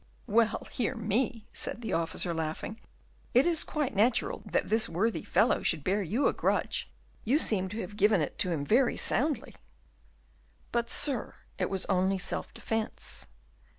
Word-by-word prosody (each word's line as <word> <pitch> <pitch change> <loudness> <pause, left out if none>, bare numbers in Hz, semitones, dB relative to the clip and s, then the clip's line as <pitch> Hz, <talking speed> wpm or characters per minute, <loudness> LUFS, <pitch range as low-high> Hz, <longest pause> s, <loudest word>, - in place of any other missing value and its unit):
"Well! 225 +1 +1
hear 245 +1 -1
me," 225 +1 -1
said 235 - -2
the 220 - -3
officer, 170 +1 0
laughing, 160 +7 -4 0.6
"it 250 - +6
is 335 -2 +2
quite 295 -3 -2
natural 225 +4 +2
that - - 0
this 220 +1 +4
worthy 210 +7 0
fellow 210 +7 +2
should 155 -4 0
bear 200 +5 +1
you 210 - 0
a - - +1
grudge, - - -1 0.3
you 255 +7 +2
seem 190 -10 +2
to 215 +4 -4
have 205 +3 -8
given 210 -1 +4
it 150 - -2
him 165 -6 -1
very 240 - +3
soundly." 295 +2 0 1.2
"But, 235 0 -1
sir, 280 -6 +4 0.2
it 185 - 0
was 190 -1 -2
only 190 +1 +1
in - - -4
self - - -4
defence." 225 0 -4
215 Hz, 160 wpm, -29 LUFS, 185-240 Hz, 1.2 s, it